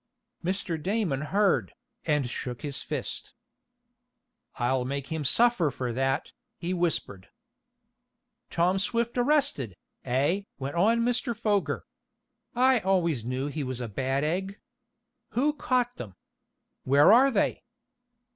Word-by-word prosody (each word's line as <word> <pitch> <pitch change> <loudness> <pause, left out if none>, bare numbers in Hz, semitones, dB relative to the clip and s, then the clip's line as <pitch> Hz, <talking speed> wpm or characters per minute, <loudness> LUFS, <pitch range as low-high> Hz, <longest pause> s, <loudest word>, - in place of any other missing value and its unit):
Mr. 175 -3 -2
Damon 185 -7 0
heard, 195 +5 +1 0.3
and 150 -4 +2
shook 120 -1 -5
his 140 -2 -2
fist. - - -5 1.2
"I'll 125 +1 +1
make 140 +1 -4
him 160 -2 -2
suffer 215 - +3
for 125 -2 -4
that," 135 +2 -1 0.3
he 175 +2 -3
whispered. 165 - -1 1.2
"Tom 180 +3 +2
Swift 230 +4 0
arrested, 245 - +1 0.3
eh?" 140 +10 +1 0.2
went 140 +1 -4
on 220 +7 +3
Mr. 245 -1 0
Foger. 210 -3 0 0.7
"I 255 0 +4
always 175 - +1
knew 130 +3 -2
he 145 +1 -3
was 130 -2 -4
a 120 - -3
bad 135 +6 -1
egg. 190 +6 -2 0.8
Who 295 +4 +3
caught 250 -4 0
them? 95 -5 -8 0.7
Where 145 +9 +6
are 260 +4 +6
they?" 215 -7 0
170 Hz, 120 wpm, -28 LUFS, 135-225 Hz, 1.2 s, Where